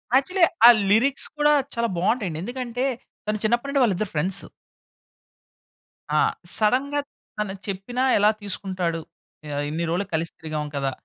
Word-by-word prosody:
Actually 340 +6 +4 0.2
ఆ - - +12 0.2
lyrics 260 +6 +3
కూడా 295 0 +4 0.2
చాలా 235 0 +1
బాగుంటాయండి. 185 -3 0
ఎందుకంటే 245 +2 -3 0.4
తను 215 - 0
చిన్నప్పటి 240 +5 +1
నుండి 280 -1 +2
వాళ్ళిద్దరు 205 -2 0
ఫ్రెండ్స్. 180 +6 -1 1.7
ఆ! - - +5 0.4
సడెన్‌గా 265 +7 +2 0.4
తను 210 -2 -2
చెప్పినా 200 +7 -2
ఎలా 210 +1 +5
తీసుకుంటాడు? 185 -4 -3 0.5
ఆహ్, 145 - -1
ఇన్ని 165 +2 -2
రోలకి 195 +3 -2
కలిసి 165 +1 -2
తిరిగాం 155 -2 -4
కదా! 135 -1 -1
210 Hz, 130 wpm, -24 LUFS, 175-250 Hz, 1.7 s, ఆ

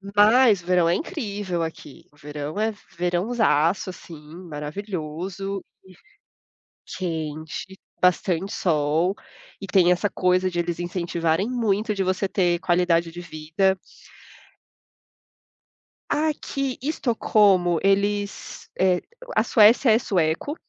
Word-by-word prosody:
mas 215 -1 +5
o - - -19
verão 175 -2 +3
é - - +3
incrível 205 - -3
aqui. 160 -3 -9
O 150 - -26
verão 150 +5 -6
é 220 0 0 0.2
verãozaço, 180 -1 +1
assim, 165 -3 -12 0.3
maravilhoso 180 +4 -5 0.2
e 190 - -16 1.0
quente, 160 +1 -5 0.2
bastante 180 +1 +1
sol, 160 +2 +1 0.5
e 195 - -6
tem 180 -1 +4
essa 190 +3 +1
coisa 185 0 +1
de 175 -1 -3
eles 170 0 -2
incentivarem 170 +2 -1
muito 220 -3 0
de 195 -2 -1
você 185 +1 0
ter 175 -3 +1
qualidade 175 -2 +1
de 175 +1 -8
vida. 165 +4 -1 2.3
Aqui 285 -3 -1
Estocolmo 210 - +2
eles, 200 +1 -1
eh, 185 -1 +3 0.3
a - - +4
Suécia 225 +2 +5
é 220 - +5
sueco, 175 - -1
185 Hz, 110 wpm, -23 LUFS, 170-205 Hz, 2.3 s, mas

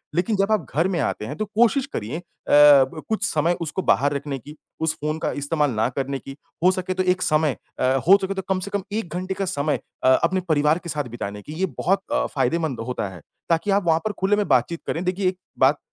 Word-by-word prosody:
लेकिन 180 +5 +1
जब 195 +2 +1
आप 215 - +1
घर 165 +4 +3
में 185 -3 -1
आते 125 -6 -2
हैं 140 - -5
तो 215 - -1
कोशिश 235 +6 +2
करिए 115 +8 -3
अ, - - -12 0.3
ब 145 +1 +6
कुछ 220 - -1
समय 160 +3 +1
उसको 170 +3 -2
बाहर 145 -4 +2
रखने 140 -1 -4
की, 145 +5 -12 0.2
उस 160 -1 +1
फ़ोन 155 +1 -1
का - - -1
इस्तेमाल 145 0 0
ना 110 0 +1
करने 135 +1 -3
की, 135 +1 -10 0.3
हो 185 - +6
सके 185 0 -2
तो 185 0 0
एक 185 0 +1
समय 155 -5 +2 0.2
अ, - - 0 0.2
हो 195 +2 +9
सके 190 0 -2
तो 190 - -3
कम 190 -1 +1
से 200 - -6
कम 200 -1 -1
1 205 -6 -3
घंटे 185 +1 -2
का 195 +1 -2
समय 150 -3 -1 0.2
अ, - - +5
अपने 185 - +2
परिवार 150 +1 +3
के 175 - -9
साथ 150 -2 -1
बिताने 105 -3 -5
की, 150 - -9
ये 180 +4 0
बहुत 195 +3 +1
अ, - - +1
फ़ायदेमंद 160 -6 0
होता 125 -5 -2
है, 90 -3 -11 0.3
ताकि 170 +5 +1
आप 200 -1 +2
वहाँ 160 -1 +4
पर 215 - 0
खुले 195 +2 +3
में 205 -1 0
बातचीत 130 +6 +1
करें। 165 - -2
देखिए 185 +1 0
एक 185 - -7 0.2
बात 135 +3 +4
165 Hz, 245 wpm, -23 LUFS, 145-190 Hz, 0.3 s, हो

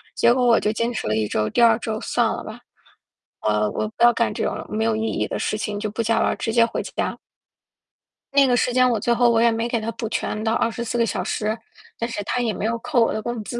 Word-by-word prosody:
结 235 - +4
果 255 0 +1
我 230 -1 +5
就 210 - 0
坚 230 +2 -1
持 235 - -4
了 105 - 0
1 110 -1 0
周， 110 +1 0
第 - - +1
2 230 -2 +6
周 220 -1 -4
算 - - +1
了 - - -3
吧。 - - -9 0.8
我 105 0 +1
我 215 - -2
不 230 - -3
要 240 - +8
干 - - 0
这 - - -3
种 - - -3
没 220 +1 -1
有 225 - +1
意 220 - -2
义 - - -1
的 - - -4
事 215 - -1
情 210 -2 -3
就 210 0 -3
不 220 - -2
加 225 0 +1
班 - - +2
儿， - - -1
直 225 - -2
接 235 -1 +5
回 230 - -3
家。 - - -3 1.2
那 280 0 +5
个 250 - +3
时 245 - +1
间 255 0 +4
我 230 -3 0
最 235 +3 +1
后 240 +1 +4
我 230 -1 +3
也 235 0 +5
没 225 +1 -1
给 235 -1 -1
他 220 +1 -3
补 225 0 -4
全 215 -1 -2
到 225 0 +1
24 235 +1 -1
个 235 - +3
小 - - -2
时， 215 +1 -2 0.4
但 230 - -3
是 220 -3 -4
他 245 +4 -1
也 230 -3 0
没 200 - -4
有 230 +1 0
扣 245 0 +1
我 - - 0
的 215 - -3
工 235 0 -4
资。 240 +3 -5
230 Hz, 285 characters per minute, -22 LUFS, 215-235 Hz, 1.2 s, 要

